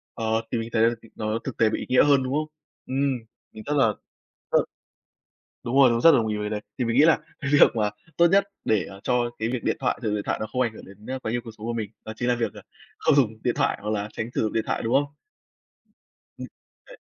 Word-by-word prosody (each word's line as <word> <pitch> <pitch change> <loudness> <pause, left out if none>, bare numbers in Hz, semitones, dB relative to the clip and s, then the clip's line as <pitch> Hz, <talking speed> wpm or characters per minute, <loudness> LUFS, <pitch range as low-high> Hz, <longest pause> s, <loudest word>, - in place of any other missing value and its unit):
Ờ, 110 0 0
thì 120 - +1
mình 115 0 -4
thấy 110 - +2
là 115 +1 +4
c - - -20 0.2
nó 110 +1 -1
thực 135 - -5
tế 110 -1 +4
bị - - -2
ý - - -6
nghĩa 125 +2 +5
hơn, 140 -2 +4
đúng 130 +1 -3
không? 155 +1 0 0.4
Ừm, 135 -1 0 0.3
mình 110 - -10
rất 150 - -1
là 125 -5 +5 0.6
rất - - +6 1.1
đúng 120 +3 -3
rồi, 135 -3 +7
đúng, 115 0 +1
rất 165 - +8
đồng 115 -6 +3
ý 105 -1 -1
với 105 - -3
cái - - -2
đấy. 105 -1 -3 0.2
Thì 125 - 0
mình 115 +1 0
nghĩ 150 - +7
là 165 - +5 0.2
cái 140 -1 -3
việc 145 - +6
mà 105 -2 +1 0.3
tốt 170 0 +6
nhất 195 +3 +4 0.2
để, 110 -4 +2
à, 100 0 -11
cho 120 -1 +1
cái 110 +1 -1
việc 125 -1 -3
điện - - +1
thoại 125 - -1
sử 110 - -2
dụng 105 - 0
điện 105 - -3
thoại - - -1
nó - - -1
không 130 - -2
ảnh 115 -3 0
hưởng - - -12
đến, 100 +2 -15
ơ, 130 0 -4
quá 110 - -4
nhiều 120 0 -1
cuộc 115 - -8
sống 110 - -8
của 120 - -1
mình 110 -2 -4
đó 110 - -6
chính 120 - -2
là 120 - +3
việc, 115 -3 -2
ờ, - - -11 0.4
không - - +3
dùng 110 -6 +2
điện 120 - +1
thoại - - +1
hoặc 105 - -4
là 105 0 -2
tránh 110 +1 -4
sử - - +1
dụng 110 - -1
điện 110 - +1
thoại, - - -1
đúng 115 - -1
không? 145 +1 +4 1.3
Ừm, - - -6 0.4
đấy. - - -13
115 Hz, 285 wpm, -25 LUFS, 110-130 Hz, 1.3 s, rất